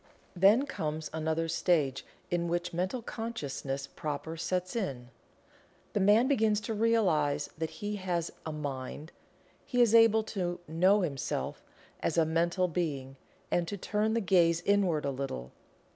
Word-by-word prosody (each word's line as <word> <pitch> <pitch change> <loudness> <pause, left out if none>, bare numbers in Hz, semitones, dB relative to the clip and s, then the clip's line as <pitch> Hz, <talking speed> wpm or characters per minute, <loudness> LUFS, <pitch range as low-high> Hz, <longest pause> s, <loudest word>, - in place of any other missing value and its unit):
Then 200 +9 +5
comes 155 - -4
another 160 +1 -1
stage 150 -5 +1 0.3
in 175 -1 0
which 175 +1 -2
mental 185 +8 -2
consciousness 145 - -4
proper 150 +3 -5
sets 180 +3 -2
in. 135 - -3 0.8
The - - +1
man 210 +6 +5
begins 220 -6 +3
to 225 - -3
realize 180 -11 +2
that 160 -1 -1
he 210 0 -4
has 175 -3 -2
"a 160 - -4
mind." 145 +1 -5 0.5
He 245 - -2
is 235 -3 +5
able 225 -1 +6
to 180 -5 -3
"know 185 +6 +4
himself" 140 -7 -3 0.4
as 165 - -1
a 165 - +5
mental 170 +3 +1
being, 145 -6 -3 0.4
and 175 -1 +1
to 205 - -4
turn 210 +3 0
the 230 - +1
gaze 170 -3 +3
inward 190 -7 +2
a 140 - 0
little. 130 - -5
175 Hz, 145 wpm, -30 LUFS, 155-205 Hz, 0.8 s, able